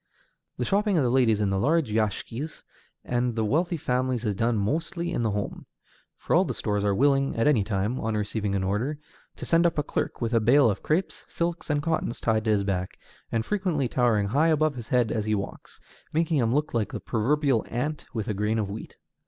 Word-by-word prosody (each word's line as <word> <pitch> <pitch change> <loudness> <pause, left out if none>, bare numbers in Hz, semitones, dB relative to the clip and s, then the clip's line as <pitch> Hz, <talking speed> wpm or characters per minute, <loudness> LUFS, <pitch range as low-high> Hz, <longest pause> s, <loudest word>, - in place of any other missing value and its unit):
The - - -1
shopping 205 -1 +2
of 150 - +3
the 120 - +1
ladies 115 -5 +3
of 100 -2 +1
the 95 - 0
large 145 +1 +2
yashikis 115 +6 -2 0.4
and 120 -1 -1
of 110 - +1
wealthy 170 - +1
families 125 -3 -1
is 105 - +1
done 115 +3 +1
mostly 165 - -1
in 175 - -1
the 115 - +1
home; 105 0 -4 0.5
for - - 0
all - - +5
the - - -3
stores 105 -1 -1
are 100 -1 +2
willing 135 +2 +2
at 115 - +1
any 135 -9 +4
time, 105 +4 -1
on 110 0 -2
receiving 105 -1 -2
an 95 - 0
order, 110 +10 -1 0.4
to - - -7
send 170 +1 +4
up 170 - -3
a 150 - +2
clerk - - -3
with 115 0 -2
a 115 - +5
bale 120 +2 +5
of 100 - -5
crêpes, 170 +5 -1
silks, 170 0 -3
and 145 -1 +1
cottons 160 -7 -1
tied 110 -1 0
to - - +1
his 105 -2 +2
back, 95 -2 -2 0.3
and 115 -1 0
frequently 180 -9 0
towering 115 -5 +1
high 145 +8 +3
above 155 -1 +2
his 120 -4 -8
head 125 -3 +2
as 110 -2 -1
he 110 0 +1
walks, 100 -1 -7 0.3
making 160 0 +1
him 115 -4 +2
look 150 +4 0
like 110 -4 0
the - - -4
proverbial 130 +2 +1
ant 145 +6 -3
with 110 -3 -4
a 105 - 0
grain 105 +3 0
of 105 -3 -2
wheat. 110 - -8
120 Hz, 220 wpm, -26 LUFS, 105-150 Hz, 0.5 s, all